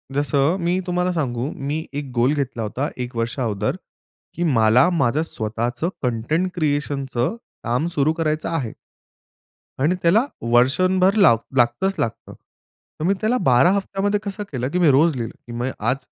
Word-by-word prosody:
जसं 145 +4 +2
मी 175 +2 +1
तुम्हाला 180 +1 0
सांगू, 130 -4 -2
मी 150 +4 -4
एक 140 -2 -5
गोल 120 +4 +3
घेतला 135 -5 -2
होता, 130 +7 -2
एक 125 0 -5
वर्षा 115 +3 -2
अगोदर 105 -4 -1 0.6
की 175 - -2
मला 125 -1 +4
माझं 150 -4 +1
स्वतःचं 120 +4 -2
कंटेंट 125 +10 0
क्रिएशनचं 145 - -1 0.3
काम 120 +6 0
सुरू 145 +2 +2
करायचं 155 -1 -1
आहे. 140 -9 -2 1.1
आणि 155 +7 +2
त्याला 200 +9 +4 0.3
वर्षभर 185 +10 +4
ला 190 - +6 0.2
लागतंच 120 +11 +2
लागतं. 115 - -3
तर - - -15
मी 195 - +3
त्याला 225 +4 +2
12 130 +7 +5
हप्त्यामध्ये 200 +1 0
कसं 205 0 -4
केलं? 130 -2 -2
की 180 +4 -1
मी 170 - +5
रोज 150 +3 +4
लिहिलं 115 -3 -4
की - - -8
म्हणजे 120 +2 -3 0.2
आज 135 - -1
145 Hz, 155 wpm, -21 LUFS, 120-175 Hz, 1.1 s, ला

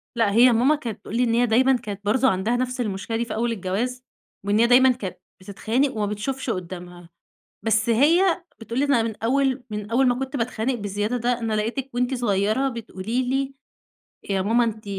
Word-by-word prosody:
لا 225 -3 +2
هي 240 +4 +6
ماما 260 +7 +3
كانت 230 -8 -6
تقول 225 - -7
لي 250 - +3
إن 230 -1 +1
هي 245 +1 +3
دايمًا 255 +4 +4
كانت 205 -3 -8
برضه 260 +5 +3
عَندها 190 +6 0
نفْس 250 0 -2
المشكلة 215 +1 -3
دي 235 - -1
في 225 - -5
أول 235 +1 0
الجواز، 230 +6 -3 0.4
وإن 205 +2 +1
هي 235 - +5
دايمًا 255 +1 +6
كانت 205 -7 -5 0.2
بتتخانق 225 +8 -1
وما 210 - 0
بتشوفش 240 +6 -3
قُدّامها، 175 -2 -6 0.5
بس 225 +1 +1
هي 335 - +3 0.2
بتقول 230 +3 -4
لي 285 - +2
إن 240 -5 +2
من 220 -2 -4
أول 265 +1 +1
من 210 +1 -6
أول 260 +2 +3
ما 245 - +3
كُنت 270 +1 -4
باتخانق 240 +1 -1
بالزيادة 205 +3 -2
ده 240 +1 0
أنا 225 -2 -2
لقيتِك 235 +6 -2
وأنتِ 250 +2 0
صغيرة 220 +2 +1
بتقولي 230 +2 -3
لي 270 +1 -1 0.8
يا 190 -1 +1
ماما 235 +4 +3
أنتِ 220 -1 -4
235 Hz, 195 wpm, -23 LUFS, 210-255 Hz, 0.8 s, هي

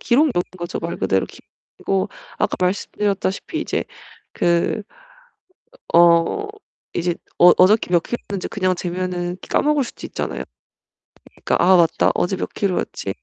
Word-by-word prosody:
기록용인 280 +3 +3 0.3
거죠 175 0 -4
말 170 0 -4
그대로 95 0 +1
기록용이고. 195 -1 -5 0.3
아까 - - 0
말씀드렸다시피 200 - -1
이제 - - -2 0.5
그 170 +5 +1 1.1
어 170 - +4 0.5
이제 175 0 0 0.2
어 175 - +8
어저께 205 +3 +4
몇 175 -2 +4
키로였는지 200 -5 -5
그냥 185 -3 0
재면 180 0 -3
까먹을 295 -2 +2
수도 - - -8
있잖아요. - - -4 1.0
그러니까 - - +2
'아 185 +1 +6
맞다. 170 -2 +3
어제 190 +2 0
몇 - - -4
키로였지? 185 - -2
185 Hz, 305 characters per minute, -21 LUFS, 175-205 Hz, 1.1 s, 어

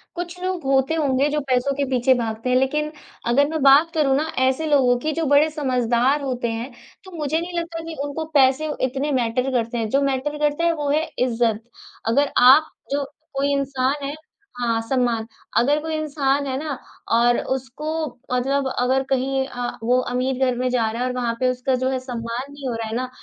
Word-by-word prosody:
कुछ 350 +1 -5
लोग 370 -3 -2
होते 270 +2 +2
होंगे 280 -2 +1
जो 300 +1 0
पैसों 255 +2 +2
के 280 0 0
पीछे 255 0 +3
भागते 230 -1 -2
हैं 250 - +3
लेकिन 300 +4 0 0.4
अगर 275 +4 +4
मैं 315 -1 -2
बात 280 +4 +6
करूँ 290 -4 +2
ना 310 +2 0 0.2
ऐसे 265 +5 0
लोगों 260 -5 +4
की 310 +5 -1
जो 325 +1 -1
बड़े 290 +2 +4
समझदार 255 -2 +1
होते 255 -3 -2
हैं 230 +4 -5 0.3
तो 375 - -12
मुझे 305 +1 0
नहीं 345 +1 -3
लगता 335 -1 -5
कि 325 0 -7
उनको 290 +3 -4
पैसे 275 +2 +4 0.2
इतने 270 +3 -2
मैटर 250 0 0
करते 240 -1 -1
हैं। 225 -2 -1
जो 275 +5 +2
मैटर 275 +2 -1
करता 295 +2 0
है 335 - +3
वो 295 -3 -3
है 305 +2 +2 0.2
इज़्ज़त। 230 -3 +1 0.4
अगर 280 +5 +2
आप 270 +6 +7 0.2
जो 285 0 0 0.3
कोई 280 +1 +1
इंसान 275 0 -1
है 285 +2 -4 0.4
हाँ, 230 -2 0
सम्मान। 235 -1 0 0.3
अगर 285 +5 +3
कोई 320 +1 -4
इंसान 285 -2 0
है 260 - -2
ना 290 -2 -4 0.3
और 240 +1 +4 0.2
उसको 265 +3 -7 0.5
मतलब 270 +2 +1
अगर 260 +2 +2
कहीं 270 0 0
अ, 245 -2 -4
वो 250 +2 +3
अमीर 255 +1 -1
घर 250 -1 +1
में 255 +1 0
जा 235 -3 +1
रहा 230 +2 -4
है 250 - +1
और 250 - -2
वहाँ 240 -2 -1
पे 255 - +2
उसका 255 +1 -1
जो 260 - +1
है 260 -1 -1
सम्मान 245 +1 -5
नहीं 285 -1 -7
हो 240 - -2
रहा 225 -1 -4
है 220 - -4
ना 255 +1 -2
265 Hz, 205 wpm, -22 LUFS, 250-295 Hz, 0.5 s, आप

